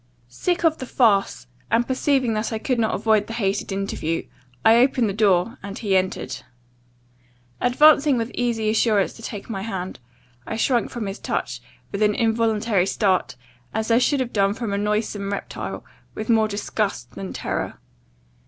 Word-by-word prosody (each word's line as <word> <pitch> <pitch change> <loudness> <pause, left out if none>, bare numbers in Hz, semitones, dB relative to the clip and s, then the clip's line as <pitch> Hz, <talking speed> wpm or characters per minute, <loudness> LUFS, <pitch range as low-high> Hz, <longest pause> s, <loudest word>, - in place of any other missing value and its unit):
"Sick 350 - -1
of 320 -1 +3
the 260 - -6
farce, 210 - +2 0.2
and 230 +1 +2
perceiving 260 -2 +1
that 215 +2 -2
I 220 - -1
could 245 +2 -1
not 220 -1 +1
avoid 215 0 +2
the 225 - -6
hated 200 -3 -1
interview, 195 -4 -2 0.4
I 225 +1 +7
opened 250 -1 +3
the 200 - -2
door, 200 +1 +2
and 200 0 -7
he 200 -4 0
entered. 185 0 -1 1.2
Advancing 285 +2 +5
with 230 +1 -2
easy 230 -3 0
assurance 215 -3 +2
to - - -13
take 210 -3 -7
my 195 -4 -4
hand, 190 - -5 0.5
I - - -3
shrunk 235 +1 +1
from 235 -3 -5
his 195 +1 -5
touch, - - -3 0.3
with 200 - -4
an 210 -1 +3
involuntary 225 -4 +1
start, 195 -3 +1 0.4
as 220 +1 -1
I 230 - +5
should 270 +2 +2
have 250 -2 -3
done 200 -1 +2
from 225 -4 -3
a - - 0
noisome 210 -1 -1
reptile, 200 - -5 0.3
with 215 - -5
more 220 -1 +4
disgust 205 - -3
than 95 -2 -7
terror. - - -3
220 Hz, 170 wpm, -23 LUFS, 200-235 Hz, 1.2 s, I